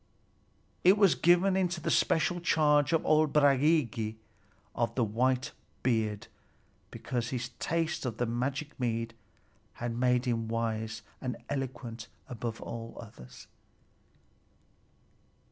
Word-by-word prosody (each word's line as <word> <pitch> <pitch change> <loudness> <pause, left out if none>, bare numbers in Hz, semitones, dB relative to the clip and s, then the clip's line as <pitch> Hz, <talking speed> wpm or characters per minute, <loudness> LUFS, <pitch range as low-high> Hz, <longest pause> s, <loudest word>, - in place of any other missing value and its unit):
It 190 +3 +6
was 200 -4 +5
given 175 +3 +4
into 180 -2 0
the - - -2
special 175 +2 +2
charge 150 -4 +3
of 165 - +1
old 155 -1 +4
Bragi 140 -6 +2 0.6
of 120 -1 -1
the 125 - +2
white 125 +4 0 0.3
beard, 110 -4 0 0.6
because 120 -2 -3
his 125 -1 -3
taste 165 0 -1
of 115 -3 -4
the 120 - 0
magic 135 +6 -3
mead 115 -2 -1 0.6
had 120 -1 -4
made 125 +1 +2
him 115 -2 -1
wise 110 -1 -2 0.2
and 125 -2 -3
eloquent 120 -4 -4 0.2
above 115 -2 -5
all 115 0 -7
others. 65 - -12
125 Hz, 115 wpm, -30 LUFS, 115-150 Hz, 0.6 s, It